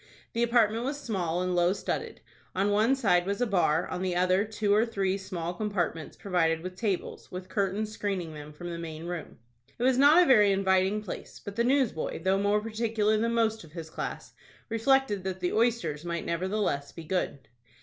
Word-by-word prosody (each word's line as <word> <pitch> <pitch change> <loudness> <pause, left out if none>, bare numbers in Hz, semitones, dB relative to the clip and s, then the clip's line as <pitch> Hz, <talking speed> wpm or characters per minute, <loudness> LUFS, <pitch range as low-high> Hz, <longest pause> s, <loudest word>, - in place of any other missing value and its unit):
The 230 - -1
apartment 230 -1 +3
was 280 +3 -3
small, 180 - -1
and 185 0 -1
low 175 +1 +3
studded. - - -4 0.3
On 195 +2 +2
one 220 +6 +3
side 190 -8 +2
was 200 +2 -1
a 245 - +2
bar, 170 -7 +2
on 180 - -4
the 185 -2 -1
other, 185 +2 +3
two 210 -1 0
or 215 +2 +5
three 195 -5 0
small 180 -3 -4
compartments 175 -5 -3
provided 165 -4 +1
with 185 +1 -6
tables, 200 -3 -3
with 185 0 -7
curtains 200 +2 -1
screening 195 -6 -3
them 150 0 -9
from 175 +3 -7
the 170 - -5
main 160 -1 -6
room. 175 -2 -6 0.4
It 235 - -3
was 260 0 +3
not 300 +6 +7
a - - +2
very 210 -8 +6
inviting 190 +1 +2
place, 195 - -7
but 200 - -8
the 235 - +2
newsboy, 245 - 0
though 190 +1 +2
more 205 +1 +2
particular 220 -1 0
than 230 +2 0
most 220 -2 +1
of 155 -2 -15
his 165 -2 -7
class, - - -5 0.4
reflected 230 -3 +2
that 190 -1 -3
the 180 -1 -1
oysters 220 -10 +1
might 170 -1 -3
nevertheless 175 -5 -1
be 165 - -9
good. 160 -4 -2
195 Hz, 195 wpm, -28 LUFS, 175-220 Hz, 0.4 s, not